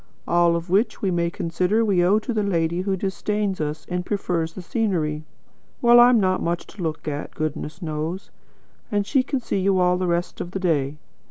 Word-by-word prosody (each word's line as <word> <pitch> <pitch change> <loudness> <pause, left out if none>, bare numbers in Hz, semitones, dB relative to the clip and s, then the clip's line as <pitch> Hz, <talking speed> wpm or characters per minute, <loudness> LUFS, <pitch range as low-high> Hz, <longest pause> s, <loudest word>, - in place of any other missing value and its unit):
All 170 0 +3
of 170 +1 -4
which 210 +4 +1
we 190 - +2
may 170 -1 +1
consider 180 +6 0
we 190 -4 +3
owe 190 +4 +4
to 230 +3 -3
the 215 - +1
lady 170 -3 0
who 190 0 -1
disdains 200 0 -2
us 150 +1 -3
and 180 0 -2
prefers 175 -4 -2
the 190 - -7
scenery. 165 -8 -1 0.5
Well, 240 0 +7
I'm 240 -1 +7
not 185 -2 +1
much 170 +1 -1
to 205 - -11
look 160 -2 -3
at, 145 0 -4
goodness 155 +2 -4
knows; 160 +4 -4 0.6
and 205 -1 +1
she 270 +5 +2
can 265 +1 -2
see 200 - -1
you 190 0 +2
all 180 0 +3
the 185 - 0
rest 175 0 -1
of 175 - -5
the 195 - -4
day. 150 -5 0
180 Hz, 200 wpm, -23 LUFS, 165-200 Hz, 0.6 s, Well